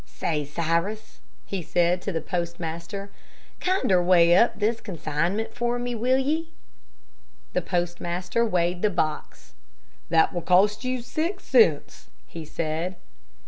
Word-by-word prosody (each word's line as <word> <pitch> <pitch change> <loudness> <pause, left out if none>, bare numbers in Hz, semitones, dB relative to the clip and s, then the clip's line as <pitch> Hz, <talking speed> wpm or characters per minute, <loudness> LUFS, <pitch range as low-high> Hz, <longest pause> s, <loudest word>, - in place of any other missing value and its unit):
"Say, 145 - -2
Cyrus," 170 +8 -2 0.3
he 195 -2 -4
said 175 +2 +1
to 200 - -3
the 165 -3 -2
postmaster, 170 +3 -4 0.5
"kinder 365 - +2
weigh 175 -1 +5
up 235 - +4
this 220 +2 0
consignment 185 +4 -2
for 240 0 -1
me, 245 0 -3
will 250 +3 +2
ye?" 310 +5 -1 1.0
The - - +1
postmaster 175 +4 -1
weighed 180 -4 0
the 210 - +3
box. 155 -5 -3 0.6
"That 160 -1 +3
will 175 - -2
cost 200 +6 +3
you 255 -1 -2
six 335 +9 -3
cents," 220 - +2 0.2
he 165 - -8
said. 165 +4 -3
180 Hz, 130 wpm, -25 LUFS, 170-230 Hz, 1.0 s, weigh